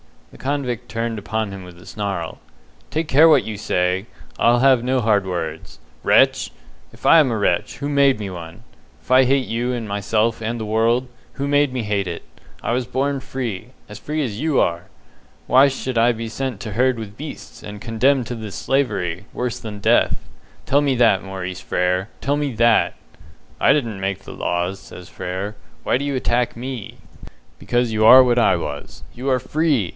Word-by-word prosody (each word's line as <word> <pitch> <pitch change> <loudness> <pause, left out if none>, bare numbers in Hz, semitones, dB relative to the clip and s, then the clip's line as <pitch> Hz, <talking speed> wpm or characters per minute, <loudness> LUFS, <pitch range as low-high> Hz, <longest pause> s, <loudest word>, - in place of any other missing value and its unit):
The - - -15
convict 130 -4 -3
turned 115 -1 -3
upon 110 0 -3
him 95 -1 -8
with 90 -1 -12
a 90 - -15
snarl. 95 -6 -4 0.5
"Take 155 0 -2
care 155 +5 +7
what 150 -5 +5
you 110 - -5
say! 90 -1 0 0.3
I'll 120 +1 +4
have 130 -1 +5
no 130 0 +1
hard 105 -3 +2
words. 80 -3 -5 0.3
Wretch! - - +3 0.4
If - - -14
I 165 - +8
am 145 -4 +4
a 115 - -1
wretch, 100 +3 0
who 145 +1 -3
made 140 -3 +4
me 105 -2 -5
one? 85 -2 -9 0.4
If - - -11
I 130 0 +6
hate 135 0 +2
you 120 +2 -2
and 115 -3 -4
myself 105 +3 0
and 115 +2 -2
the 110 - -4
world, 115 +4 +1 0.2
who 140 - -3
made 145 -2 +2
me 125 -3 -2
hate 100 -2 -1
it? 85 -1 -5 0.4
I - - -1
was 125 0 -1
born 140 +2 -1
free 125 -4 -5 0.2
as 105 0 -9
free 155 0 -2
as 110 -6 -4
you 155 -1 +1
are. 85 0 +1 0.6
Why 135 +2 +6
should 130 -2 -3
I 120 +1 +4
be 115 0 -5
sent 130 +2 -4
to 110 - -5
herd 125 +3 +2
with 110 -1 -8
beasts, 150 +1 -9
and 105 0 -9
condemned 125 +3 +2
to 120 - -4
this 110 -5 -7
slavery, 95 - -1
worse 125 -2 -3
than 105 -2 -7
death? - - +3 0.5
Tell 140 +2 +3
me 140 -2 +1
that, 115 -5 +4
Maurice 95 -2 -6
Frere 90 +2 0
tell 140 +2 0
me 145 -3 -2
that!" 115 +1 +3 0.6
"I - - +5
didn't 115 -9 -2
make 95 0 -2
the - - -11
laws," 90 +2 -2
says 90 - -12
Frere, 95 +4 -5 0.3
"why - - +2
do 140 - -3
you 140 -1 -1
attack 125 -1 0
me?" 125 -2 -6 0.6
"Because 120 -1 0
you 110 0 +2
are 130 +3 +10
what 120 -1 +2
I 115 - +4
was. - - -6
You 130 +3 -4
are 130 - +3
FREE! 145 - 0
115 Hz, 195 wpm, -21 LUFS, 100-130 Hz, 0.6 s, are